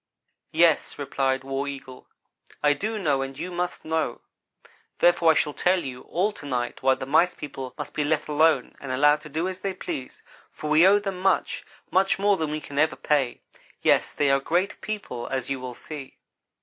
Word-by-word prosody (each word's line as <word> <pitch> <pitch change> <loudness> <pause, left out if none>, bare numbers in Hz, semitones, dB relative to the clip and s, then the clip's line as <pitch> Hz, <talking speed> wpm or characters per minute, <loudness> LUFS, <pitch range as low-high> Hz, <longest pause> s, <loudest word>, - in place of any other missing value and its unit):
"Yes," 165 -1 +3
replied 135 -2 -1
War 135 +1 -3
Eagle, 135 -2 -8 0.6
"I 145 0 +5
do 215 +9 -3
know 145 -9 +1
and 135 0 -5
you 180 - -5
must 175 0 -3
know. 160 -6 -1 0.8
Therefore 175 -1 +4
I 160 - +6
shall 150 - +1
tell 180 +2 +2
you 125 -2 -6
all 195 +5 +1
to 175 -8 -10
night 125 -3 -2
why 130 0 +4
the 130 - -6
Mice 160 +6 +3
people 135 -3 -7
must - - -6
be 150 - 0
let 150 +1 0
alone 150 -3 +2
and 135 - -5
allowed 145 +3 +4
to 155 - -11
do 160 +5 -1
as 185 -1 -5
they 195 -1 -3
please, 130 -7 -6 0.3
for 150 - -5
we 160 +4 +7
owe 200 +1 +6
them 195 -3 -3
much; 190 0 +1 0.3
much 190 +1 +3
more 200 +1 +3
than 160 -5 -2
we 155 +1 -2
can 145 -1 -5
ever 155 -3 +3
pay. 135 -2 0 0.4
Yes - - +3
they 145 -2 +2
are 135 - +4
great 175 +8 -1
people, 200 - -5
as 135 0 -3
you 135 - -1
will 125 -1 -6
see. 145 -1 -9
150 Hz, 200 wpm, -25 LUFS, 135-175 Hz, 0.8 s, we